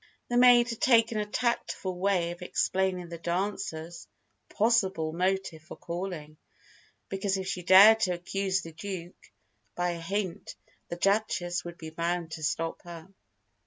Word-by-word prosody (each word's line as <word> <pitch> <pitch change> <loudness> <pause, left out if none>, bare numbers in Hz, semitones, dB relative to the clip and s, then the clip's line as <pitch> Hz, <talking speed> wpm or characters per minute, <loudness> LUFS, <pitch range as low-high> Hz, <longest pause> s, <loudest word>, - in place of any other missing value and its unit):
The 240 - +1
maid 245 -1 +6
had 230 - -7
taken 230 -3 +4
a 210 - -2
tactful 210 -4 -2
way 180 -3 +1
of 175 - -10
explaining 185 0 -1
the 170 -1 -7
dancer's 175 -2 -4 0.4
(possible) 195 -8 +1
motive 185 -2 -1
for 160 - -11
calling; 170 -3 -6 0.7
because 195 0 -1
if 190 -1 -5
she 185 -2 -3
dared 195 +5 +8
to 185 -5 +1
accuse 190 +2 -2
the 165 - -9
Duke 180 0 -8 0.4
by 175 0 0
a 170 -1 -6
hint, 195 +1 -4 0.3
the - - -3
Duchess 175 -2 0
would 170 0 -8
be 160 -1 -8
bound 170 0 -2
to 160 - -7
stop 165 +2 -2
her. 170 +1 -11
185 Hz, 150 wpm, -28 LUFS, 170-200 Hz, 0.7 s, dared